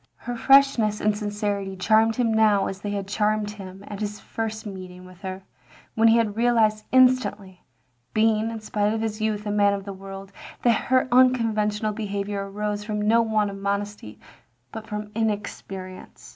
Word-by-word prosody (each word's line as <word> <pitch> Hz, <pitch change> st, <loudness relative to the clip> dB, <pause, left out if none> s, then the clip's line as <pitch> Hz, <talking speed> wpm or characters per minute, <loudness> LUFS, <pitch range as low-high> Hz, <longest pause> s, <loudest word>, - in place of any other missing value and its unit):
Her 245 Hz, -, -6 dB
freshness 245 Hz, -5 st, +4 dB
and 210 Hz, 0 st, +1 dB
sincerity 205 Hz, -2 st, -3 dB
charmed 220 Hz, +3 st, +3 dB
him 230 Hz, -2 st, +1 dB
now 215 Hz, -3 st, +4 dB
as 195 Hz, 0 st, -5 dB
they 205 Hz, -, -4 dB
had 200 Hz, -1 st, -3 dB
charmed 210 Hz, 0 st, 0 dB
him 195 Hz, -2 st, -10 dB
at 205 Hz, -, -7 dB
his 210 Hz, -1 st, -4 dB
first 220 Hz, -1 st, -5 dB
meeting 185 Hz, -2 st, -9 dB
with 185 Hz, 0 st, -15 dB
her, 190 Hz, 0 st, -6 dB, 0.5 s
when 225 Hz, +1 st, +4 dB
he 225 Hz, +1 st, +6 dB
had 220 Hz, -3 st, 0 dB
realised 225 Hz, -2 st, +2 dB
instantly 250 Hz, -7 st, +2 dB, 0.5 s
(being, 220 Hz, 0 st, +2 dB
in 225 Hz, -1 st, -5 dB
spite 210 Hz, 0 st, 0 dB
of 220 Hz, -, -2 dB
his 220 Hz, -1 st, -3 dB
youth, 215 Hz, -1 st, -1 dB
a 205 Hz, -, -2 dB
man 205 Hz, -1 st, +3 dB
of 195 Hz, -1 st, -7 dB
the 200 Hz, -, -6 dB
world) 195 Hz, 0 st, -9 dB, 0.3 s
that 235 Hz, -3 st, +2 dB
her 260 Hz, 0 st, +3 dB
tinconventional 225 Hz, -4 st, +2 dB
behaviour 200 Hz, -1 st, -3 dB
arose 210 Hz, +1 st, -3 dB
from 210 Hz, 0 st, -3 dB
no 220 Hz, +3 st, +4 dB
want 215 Hz, -2 st, 0 dB
of 195 Hz, -, -8 dB
modesty, 200 Hz, -, -4 dB, 0.5 s
but 220 Hz, 0 st, -8 dB
from 210 Hz, 0 st, -5 dB
inexperience. 200 Hz, -4 st, -5 dB
210 Hz, 170 wpm, -24 LUFS, 200-220 Hz, 0.5 s, he